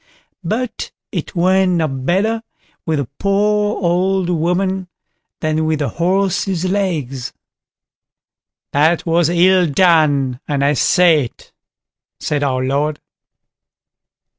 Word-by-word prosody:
But 225 +6 -3 0.2
it - - -5
went 185 +1 +2
no 165 -2 +1
better 185 +12 -1 0.5
with 160 -1 +1
the 140 -4 -2
poor 210 +1 +1
old 180 +1 +1
woman 180 +3 -1 0.5
than 155 0 0
with 155 0 +1
the 145 -3 -2
horse's 185 - 0
legs. 160 -10 -2 1.4
"That 155 +4 +2
was 165 -1 +2
ill 180 +1 +4
done, 145 -6 +2
and 140 -1 0
I 145 - +3
say 160 0 +3
it", 115 - -14 0.7
said 150 -1 -2
our 130 -2 0
Lord. 145 +3 -1
170 Hz, 110 wpm, -17 LUFS, 145-190 Hz, 1.4 s, ill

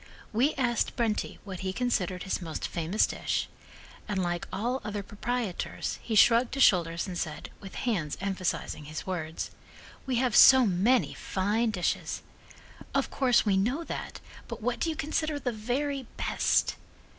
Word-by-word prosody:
We 255 +8 +2
asked 240 -4 0
Brenti 225 -3 -1
what 190 -3 -7
he 190 -1 -2
considered 190 -5 -1
his 190 - -2
most 160 -3 -4
famous 170 +5 +1
dish, - - -2 0.6
and 205 -2 -1
like 175 0 -2
all 245 +6 -1
other 205 -1 -4
proprietors, 215 -1 -3
he 225 - -3
shrugged 235 +4 +5
his 275 - +4
shoulders 170 -2 +3
and 185 -3 -6
said, 155 -3 -4
with 195 -2 -10
hands 180 - -1
emphasizing 185 -5 -2
his 155 +1 -6
words: 165 -4 -4 0.6
"We 260 - 0
have 245 -2 +1
so 260 -2 +9
many 215 +6 +2
fine 210 +5 0
dishes." 180 -5 -2 0.7
"Of - - +1
course 250 -4 +3
we 200 -2 +3
know 250 +12 0
that, - - -6 0.3
but - - -6
what - - 0
do 335 - 0
you 320 - -2
consider 310 0 -1
the 255 -3 -1
very 255 +4 -2
best?" - - +1
210 Hz, 155 wpm, -29 LUFS, 185-250 Hz, 0.7 s, so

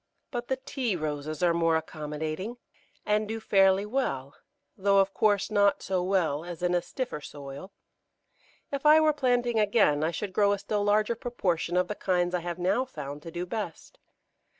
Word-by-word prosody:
But 240 -2 -4
the 265 - 0
Tea 260 -5 -2
Roses 155 -1 -3
are 170 -1 +4
more 165 -1 +2
accommodating, 155 +7 -4 0.5
and 210 0 +1
do 225 +1 -3
fairly 195 -2 +4
well, 175 - -2 0.4
though, 200 +1 +2
of 195 0 +3
course, 210 -1 +2
not 200 -1 +3
so 185 -1 0
well 180 -5 0
as 175 -1 -7
in 180 0 +2
a 175 - +2
stiffer 180 - -5
soil. 145 +6 -9 1.0
If 280 -1 -3
I 305 +1 +7
were 310 -1 +4
planting 245 -4 +1
again 200 -8 +3
I 160 - +2
should 185 +3 -4
grow 205 0 +3
a - - -1
still 205 +1 -2
larger 210 +2 +2
proportion 185 -8 -1
of 180 0 +2
the 210 - -2
kinds 180 -3 0
I 180 - +1
have 175 0 -5
now 185 +8 +1
found 150 - -7
to 165 - -8
do 175 +2 -4
best. 190 -3 -6
190 Hz, 180 wpm, -28 LUFS, 165-215 Hz, 1.0 s, I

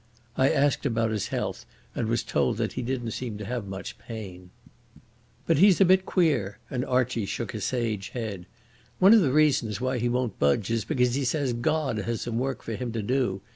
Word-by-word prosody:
I 130 - +3
asked 145 0 +2
about 115 -2 0
his 105 -3 -2
health, - - -3 0.3
and 115 - -2
was 115 +1 0
told - - 0
that - - -2
he - - -3
didn't 120 -2 -3
seem 115 -4 -5
to 105 - -6
have 120 -1 -4
much 95 0 -7
pain. 95 -6 -9 1.0
"But - - +2
he's 195 0 +6
a 195 - +7
bit 185 +1 +4
queer," 130 - +1
and 125 -1 -1
Archie 125 -5 0
shook - - -4
a - - -5
sage 110 -6 -2
head. 105 -7 -5 0.5
"One 195 +4 +7
of 225 - +7
the 140 -7 +2
reasons 135 -8 +2
why 130 0 -1
he 120 +1 0
won't 125 -4 -1
budge 70 +10 +2
is 115 -2 0
because 125 -5 +1
he 140 +2 0
says 130 0 0
God 125 0 0
has 115 +3 -3
some 115 -1 -2
work 135 0 -3
for 115 - -4
him 120 +3 -4
to 115 -2 -2
do. 120 -5 0
120 Hz, 210 wpm, -26 LUFS, 110-135 Hz, 1.0 s, a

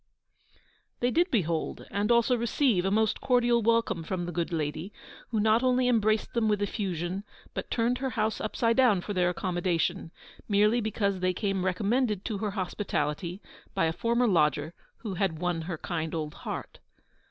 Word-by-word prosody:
They 245 +1 +1
did 345 +7 +2
behold 170 - -1
and 205 +3 0
also 235 +1 +4
receive 235 -4 +1
a - - +2
most 220 +2 +1
cordial 240 -2 +3
welcome 230 -5 +2
from 175 +2 -3
the 175 - -4
good 170 +1 -2
lady, 155 +3 -3 0.4
who 225 - 0
not 220 +2 +4
only 255 -1 +3
embraced 215 -3 +2
them 230 -2 +2
with 210 -1 +2
effusion, 190 -2 -2 0.3
but - - -5
turned 240 +1 +1
her 265 0 -1
house 220 -3 -1
upside 230 +2 0
down 235 -8 +4
for 205 - -4
their 180 -2 +2
accommodation, 175 -1 -1 0.4
merely 210 +3 +4
because 200 -3 -1
they 185 0 +1
came 195 0 -1
recommended 210 +3 0
to 215 -4 -2
her 215 0 -1
hospitality 175 -1 -2 0.3
by - - +2
a 160 - 0
former 235 +6 +1
lodger 150 - +2 0.2
who 210 -4 -5
had 185 -3 0
won 175 0 -1
her 165 0 -4
kind 160 0 -3
old 155 -2 -3
heart. - - -6
200 Hz, 170 wpm, -28 LUFS, 175-230 Hz, 0.4 s, also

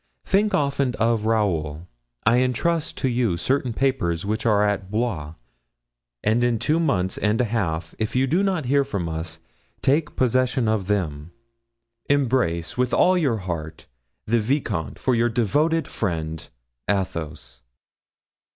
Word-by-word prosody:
Think 205 +2 +2
often 140 -3 0
of 115 -1 +1
Raoul. 85 -8 0 0.4
I 115 +2 +5
intrust 140 +6 0
to 135 - 0
you 120 -8 +1
certain 130 +6 0
papers 110 -10 0
which 110 +3 -1
are 105 -2 +4
at 100 -2 -2
Blois; 100 -9 -2 0.9
and 110 +3 +2
in 120 -1 +2
two 155 +9 +1
months 95 - 0
and 105 +1 +1
a 125 - +3
half, 85 -8 -2
if 110 +1 -2
you 130 +1 +3
do 165 +8 +2
not 190 -7 0
hear 140 +3 +3
of 100 -11 -3
us, 80 0 -5 0.5
take 150 +3 +1
possession 130 -1 +2
of 110 -4 0
them. 80 -7 -1 0.8
"Embrace, 125 -11 +1
with 125 -1 +2
all 185 - +4
your 140 -10 +1
heart, 80 -3 -5 0.4
the 115 +2 +2
vicomte, 105 - -1
for 130 - 0
your 120 0 +2
devoted, 145 - +1
friend, 80 -5 -3 0.4
"ATHOS." 85 -8 -3
115 Hz, 140 wpm, -23 LUFS, 90-130 Hz, 0.9 s, I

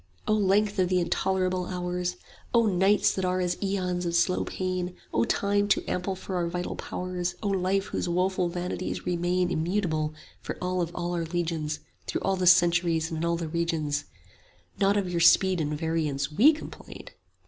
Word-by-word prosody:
O 215 - +3
length 205 0 +2
of 180 -1 +2
the 185 -1 +3
intolerable 185 0 0
hours, 180 0 -2 0.4
O 230 -1 +5
nights 195 +1 +3
that 190 - -2
are 185 0 +1
as 180 -1 0
aeons 185 -3 -1
of 170 -1 -1
slow 180 +2 +2
pain, 185 -1 -2
30 180 - -12 0.2
O 115 - +3
Time, 205 0 +1
too - - +2
ample 185 +1 -2
for 185 0 -5
our 175 -1 0
vital 175 +1 -3
powers, 180 -1 -4
O 205 - 0
Life, 195 0 +1
whose - - -3
woeful 180 0 +1
vanities 180 +1 -4
remain 180 +1 0
Immutable 160 -3 -1 0.3
for - - -5
all 180 0 -1
of 170 - -1
all 175 0 -2
our 170 -1 -1
legions 165 -2 -2 0.3
Through - - -2
all 195 - +1
the 185 -1 0
centuries 170 -2 +4
and 160 - -3
in 165 - -1
all 170 0 +1
the 165 -1 -4
regions, 155 -3 -1 0.7
Not 200 +1 +3
of 200 -2 0
your 175 -1 -1
speed 185 +1 +5
and 150 0 -2
variance 155 -3 -1
WE 240 - +6
complain. 310 - -9
180 Hz, 185 wpm, -27 LUFS, 170-190 Hz, 0.7 s, WE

